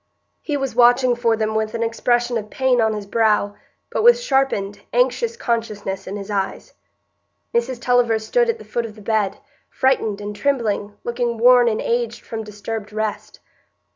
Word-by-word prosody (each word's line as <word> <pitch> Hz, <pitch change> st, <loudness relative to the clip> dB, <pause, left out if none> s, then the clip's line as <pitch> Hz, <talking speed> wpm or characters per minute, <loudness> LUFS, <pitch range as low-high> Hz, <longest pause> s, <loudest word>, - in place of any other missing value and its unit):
He 295 Hz, -2 st, -2 dB
was 270 Hz, -3 st, -3 dB
watching 245 Hz, +1 st, +4 dB
for 230 Hz, -2 st, +1 dB
them 215 Hz, 0 st, -1 dB
with 220 Hz, 0 st, -1 dB
an 230 Hz, -, -1 dB
expression 240 Hz, +1 st, 0 dB
of 215 Hz, -2 st, -3 dB
pain 260 Hz, -1 st, +2 dB
on 220 Hz, -1 st, +1 dB
his 210 Hz, -1 st, -5 dB
brow, 210 Hz, -1 st, +1 dB, 0.4 s
but -, -, -1 dB
with 480 Hz, +1 st, +6 dB
sharpened, 270 Hz, -, 0 dB
anxious 470 Hz, -2 st, +1 dB
consciousness 215 Hz, -, -3 dB
in 195 Hz, -, -5 dB
his 205 Hz, 0 st, -6 dB
eyes. 195 Hz, -1 st, -3 dB, 0.8 s
Mrs 235 Hz, +1 st, 0 dB
Tulliver 245 Hz, -2 st, +2 dB
stood 475 Hz, -, +1 dB
at 460 Hz, -, 0 dB
the -, -, -13 dB
foot 235 Hz, -1 st, -2 dB
of 215 Hz, -, -13 dB
the 215 Hz, -, -13 dB
bed, 210 Hz, -3 st, 0 dB, 0.3 s
frightened 225 Hz, -6 st, +1 dB
and 205 Hz, 0 st, -6 dB
trembling, 210 Hz, -5 st, -1 dB
looking 240 Hz, -1 st, -2 dB
worn 245 Hz, +1 st, +6 dB
and 220 Hz, -2 st, +1 dB
aged 235 Hz, -1 st, -1 dB
from 225 Hz, -1 st, -5 dB
disturbed 210 Hz, 0 st, -6 dB
rest. 215 Hz, 0 st, -4 dB
230 Hz, 170 wpm, -21 LUFS, 215-245 Hz, 0.8 s, with